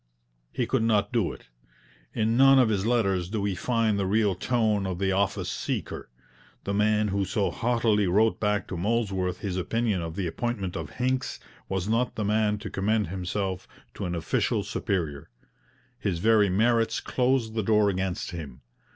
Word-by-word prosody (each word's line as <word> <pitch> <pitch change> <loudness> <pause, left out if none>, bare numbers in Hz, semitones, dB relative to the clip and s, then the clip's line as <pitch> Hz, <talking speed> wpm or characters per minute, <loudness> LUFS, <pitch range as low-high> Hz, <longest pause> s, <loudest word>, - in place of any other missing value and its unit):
He 125 - -1
could 130 0 0
not 105 -1 +1
do 115 -8 +1
it. - - -13 0.7
In 110 +1 +1
none 135 +2 +7
of 125 -4 +5
his 105 -1 0
letters 95 -7 +1
do 110 +1 -2
we 100 -1 0
find 110 +1 0
the 95 - 0
real 105 0 +2
tone 105 0 0
of 90 -2 -3
the 95 +1 0
office 95 0 0
seeker. - - -4 0.5
The 100 - -2
man 105 +1 +2
who 100 0 0
so 95 +2 0
haughtily 115 -4 +1
wrote 110 +5 +3
back 105 -1 0
to 90 - -4
Molesworth 95 -3 -1
his 95 -3 -3
opinion 105 +1 0
of 80 -1 -5
the 95 -2 -2
appointment 100 +1 -3
of 80 -4 -5
Hincks 130 +1 -2 0.3
was 95 -1 -2
not 115 +3 0
the 105 - -2
man 105 0 +1
to 105 - -7
commend 105 0 0
himself 95 0 -3 0.3
to - - -5
an 90 0 -2
official 80 - 0
superior. 80 -8 -3 0.7
His 95 -4 -1
very 105 +2 +4
merits 115 +4 +2
closed 125 -3 0
the 110 - 0
door 105 0 +3
against 95 -1 -2
him. 75 -7 -8
105 Hz, 175 wpm, -27 LUFS, 95-115 Hz, 0.7 s, none